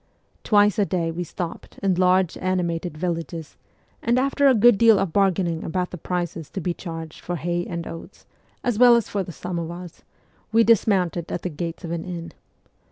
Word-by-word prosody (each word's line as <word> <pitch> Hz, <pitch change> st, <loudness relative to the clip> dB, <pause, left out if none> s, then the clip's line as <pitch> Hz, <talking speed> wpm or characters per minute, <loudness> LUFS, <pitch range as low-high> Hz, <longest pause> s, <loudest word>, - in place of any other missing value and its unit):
Twice 205 Hz, -1 st, +4 dB
a 205 Hz, -, +4 dB
day 170 Hz, -3 st, -1 dB
we 175 Hz, +2 st, -3 dB
stopped 170 Hz, 0 st, -7 dB
in 195 Hz, -1 st, +3 dB
large, 185 Hz, 0 st, +3 dB
animated 175 Hz, -3 st, -1 dB
villages, 165 Hz, -2 st, -4 dB, 0.5 s
and 235 Hz, +2 st, +2 dB
after 275 Hz, +2 st, +3 dB
a 265 Hz, -, +6 dB
good 225 Hz, -1 st, +5 dB
deal 225 Hz, -2 st, +7 dB
of 190 Hz, -4 st, -1 dB
bargaining 185 Hz, -4 st, +1 dB
about 180 Hz, +2 st, -2 dB
the 180 Hz, -, -6 dB
prices 175 Hz, -2 st, -3 dB
to -, -, -5 dB
be 175 Hz, 0 st, -1 dB
charged 165 Hz, -3 st, -7 dB
for 175 Hz, -, -3 dB
hay 175 Hz, +1 st, -2 dB
and 170 Hz, -2 st, -4 dB
oats, 165 Hz, -, -10 dB, 0.4 s
as 245 Hz, -4 st, 0 dB
well 245 Hz, -1 st, +8 dB
as 235 Hz, -, +1 dB
for 200 Hz, -, -1 dB
the 180 Hz, -, -6 dB
samovars, 175 Hz, 0 st, -6 dB, 0.5 s
we 230 Hz, +1 st, +5 dB
dismounted 190 Hz, -6 st, +2 dB
at -, -, -3 dB
the 180 Hz, -, -1 dB
gates 170 Hz, +3 st, -5 dB
of 165 Hz, -, -5 dB
an 170 Hz, -1 st, -3 dB
inn. 170 Hz, -2 st, -6 dB
180 Hz, 185 wpm, -23 LUFS, 170-200 Hz, 0.5 s, well